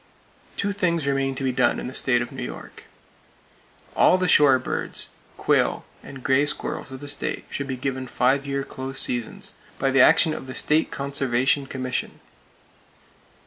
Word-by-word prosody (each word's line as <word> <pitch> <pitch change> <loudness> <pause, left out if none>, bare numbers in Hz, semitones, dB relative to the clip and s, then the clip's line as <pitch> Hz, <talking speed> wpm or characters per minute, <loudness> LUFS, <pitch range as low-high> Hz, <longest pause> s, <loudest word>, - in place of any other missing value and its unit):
Two 200 - 0
things 170 -6 0
remain 135 -1 0
to 135 - -4
be 130 - +1
done 125 - +1
in - - -6
the 125 - -6
state 120 -3 +2
of - - -9
New 135 -1 -7
York. 125 - -8 1.1
All 185 - +5
the 185 0 0
shore 145 -5 +6
birds, 130 - -2 0.3
quail - - +1 0.2
and 135 -2 -11
gray 140 +2 +3
squirrels - - -3
of 130 0 -8
the 145 - -8
state 145 - -2
should 140 - -4
be 130 -1 -4
given 130 0 -3
five 135 +3 +1
year 140 0 -2
close 135 0 -4
seasons, 120 -2 -1 0.2
by 135 0 0
the 135 -1 +5
action 155 +4 +5
of 135 - -7
the 130 - -7
State 155 +1 +2
Conservation 135 -1 0
Commission. 130 -2 -4
135 Hz, 170 wpm, -24 LUFS, 130-140 Hz, 1.1 s, shore